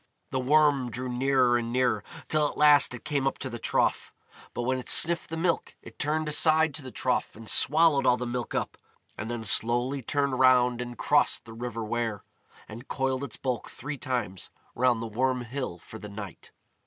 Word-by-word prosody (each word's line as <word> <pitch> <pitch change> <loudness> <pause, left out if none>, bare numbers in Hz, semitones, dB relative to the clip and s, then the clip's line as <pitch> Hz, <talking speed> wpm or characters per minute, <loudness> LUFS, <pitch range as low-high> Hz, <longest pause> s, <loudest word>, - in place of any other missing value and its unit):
The 130 - -1
Worm 140 -1 +3
drew 125 +2 -5
nearer 125 -1 +2
and 115 0 -5
nearer, 125 0 +1 0.2
till 150 -1 +1
at - - -10
last 145 -3 +5
it 120 - -12
came 140 -2 0
up - - -2
to 130 - -6
the 120 - -6
trough. - - 0 0.4
But 120 - -2
when 130 +1 0
it 125 - -8
sniffed 170 +1 +4
the 165 - -5
milk, 170 0 -1
it - - -14
turned 155 +1 0
aside 155 0 +3
to 150 - -4
the 130 - -8
trough 125 0 -2
and 110 0 -12
swallowed 155 +2 +3
all 125 - +4
the 125 - -4
milk 120 0 -4
up, - - -3 0.4
and 110 - -6
then 120 -1 -4
slowly 120 +5 +2
turned 140 +1 -1
round 125 -1 +4
and 120 -1 -7
crossed - - +2
the 115 - -11
river 115 0 -5
Wear, 110 -2 -3 0.4
and 115 +4 -11
coiled 135 0 -2
its 135 -6 -6
bulk 125 -4 -3
three 145 -1 -7
times 115 -8 -3 0.2
round 120 -2 +1
the - - -3
Worm 125 +3 -1
Hill 120 -6 -5
for 110 +5 -12
the 105 - -9
night. 100 -3 -9
125 Hz, 200 wpm, -27 LUFS, 120-140 Hz, 0.4 s, last